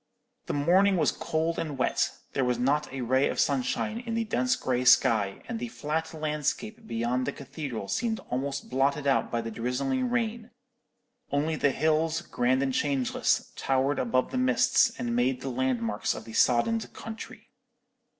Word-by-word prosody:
"The - - -2
morning 185 +7 +4
was 155 -4 +3
cold 160 +1 -1
and 150 -4 -3
wet. 130 - +1 0.2
There 135 - +1
was 125 -1 +1
not 140 +5 +1
a 135 -1 -4
ray 130 +3 +2
of - - -3
sunshine 145 - 0
in 235 -2 -4
the 230 - +1
dense 250 +3 +1
grey 125 - -1
sky, 110 -5 +4
and 235 -2 -4
the 240 - -3
flat 160 -5 -3
landscape 160 +9 -3
beyond 120 +3 -1
the - - 0
cathedral 135 -6 -6
seemed 225 - -1
almost 135 +2 -2
blotted 140 +3 +1
out 135 -1 +2
by 120 - 0
the 115 0 -5
drizzling 125 - -1
rain; 235 -1 -2 0.8
only 150 +3 +1
the 145 - +2
hills, 160 +3 +1
grand 130 -2 +1
and 135 -1 -1
changeless, 135 -2 0
towered 135 +1 +1
above 130 +1 +1
the - - -1
mists, 125 -1 +4
and 120 -1 -2
made 125 +1 +1
the 135 - -4
landmarks 120 -4 -1
of - - -8
the 115 - -10
soddened 170 - +2
country. 225 0 -9
140 Hz, 170 wpm, -28 LUFS, 125-165 Hz, 0.8 s, morning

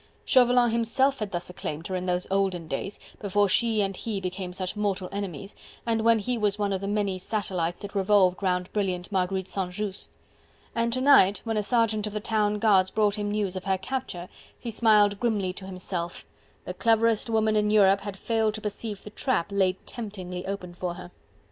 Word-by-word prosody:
Chauvelin 245 -2 +5
himself 260 +4 +2
had 210 -3 -3
thus 175 -1 -3
acclaimed 160 -2 -5
her, 185 - -3
in 185 0 -3
those 180 0 0
olden 190 -4 0
days, 160 +8 -4 0.2
before 205 0 +2
she 220 +2 +2
and 195 -1 -1
he 210 +1 -3
became 185 0 -4
such 185 +1 -4
mortal 200 -3 -1
enemies, 195 -2 -5 0.3
and 225 -1 +1
when 230 0 +5
he 240 +3 -2
was 210 -1 +1
one 205 -1 0
of 190 - -2
the 200 - -3
many 200 -2 -1
satellites 180 -4 -2
that 200 -1 -7
revolved 195 -2 +3
round 180 -1 -1
brilliant 185 -3 -2
Marguerite 190 0 0
St. 190 -2 -2
Just. 205 0 -5 0.6
And 230 0 +1
to 255 - 0
night, 255 -8 +6
when 225 -1 -2
a 210 - +2
sergeant 220 -1 +1
of 210 - -6
the 210 - -2
town 210 -1 0
guards 195 -3 +4
brought 210 0 +2
him 205 -1 -2
news 205 -3 -1
of 185 - -5
her 190 -1 +1
capture, 190 -4 -5 0.3
he 235 - -5
smiled 210 -2 +4
grimly 205 -6 0
to 190 0 -7
himself; 180 -2 -5 0.4
the - - -4
cleverest 230 -1 +2
woman 220 -1 +2
in 210 0 +2
Europe 200 -2 +5
had 200 -1 -6
failed 220 0 0
to 215 - -5
perceive 210 0 -4
the 210 - -9
trap 215 -6 -1
laid 190 -2 +2
temptingly 190 -6 -6
open 190 -3 -5
for 175 0 -4
her. 90 - -10
200 Hz, 200 wpm, -27 LUFS, 185-215 Hz, 0.6 s, night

